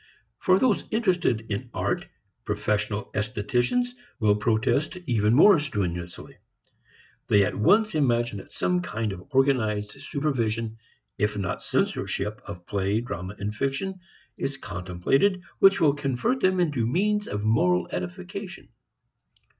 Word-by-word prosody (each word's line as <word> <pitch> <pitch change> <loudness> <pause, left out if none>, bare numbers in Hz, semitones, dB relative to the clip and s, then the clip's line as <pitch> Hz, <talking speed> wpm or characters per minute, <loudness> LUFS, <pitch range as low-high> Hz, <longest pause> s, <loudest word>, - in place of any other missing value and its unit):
For 185 0 +4
those 235 -1 +2
interested 180 - +1
in 120 +5 -3
art, - - -1 0.4
professional 105 0 -1
estheticians, 120 - 0 0.3
will 105 -2 +4
protest 110 - +1
even 110 -4 +2
more 180 +4 +7
strenuously. 90 - -4 0.9
They 100 -1 +5
at - - -2
once 210 - +3
imagine 120 -7 +1
that - - -13
some 90 0 0
kind 110 +4 -3
of 90 -1 -11
organized 120 -7 +1
supervision 115 -6 -2 0.4
if 105 +1 0
not 100 - -3
censorship 105 +2 -1
of 90 -3 -8
play, 100 +1 0
drama 95 -4 -6
and 105 +1 -4
fiction 140 - -2 0.4
is 135 0 -2
contemplated 95 - 0 0.2
which 195 0 +6
will 155 -5 +4
convert 145 - -1
them 185 -3 +2
into 145 -10 +1
means 210 - +1
of 105 0 -3
moral 90 -5 +2
edification. 90 0 -6
115 Hz, 125 wpm, -26 LUFS, 105-150 Hz, 0.9 s, more